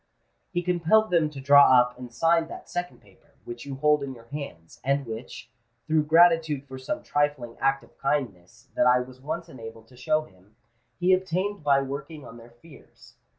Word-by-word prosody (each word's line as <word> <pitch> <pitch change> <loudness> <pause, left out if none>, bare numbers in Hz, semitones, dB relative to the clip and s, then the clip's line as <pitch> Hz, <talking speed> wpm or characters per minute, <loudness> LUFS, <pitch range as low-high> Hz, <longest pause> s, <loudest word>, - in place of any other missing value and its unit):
He 175 -1 -2
compelled 180 +5 +2
them 165 -3 +3
to 145 -2 -10
draw 140 -2 +7
up 125 0 +1
and 125 -1 -10
sign 165 +5 +2
that - - -10
second 175 0 -5
paper, - - -25
which 120 +3 -8
you 135 - -5
hold 150 +2 +2
in 135 -2 -5
your 115 -1 -15
hands, 140 - -9
and 140 +1 0
which, 115 +1 -8 0.3
through 155 +1 +1
gratitude 165 -3 +4
for 130 -1 -9
some 165 +10 -4
trifling 145 -5 -1
act 135 0 +1
of - - -21
kindness 125 -11 -3
that - - +2
I 125 0 +5
was 130 +1 -11
once 165 +4 -5
enabled 115 -6 -11
to 125 - -18
show 155 +5 0
him, 100 -3 -22 0.4
he 180 +1 +3
obtained 185 +1 -1
by 140 -1 +3
working 140 +2 -7
on 115 0 -11
their 115 0 -14
fears. 135 +5 -18
140 Hz, 190 wpm, -26 LUFS, 125-165 Hz, 0.4 s, draw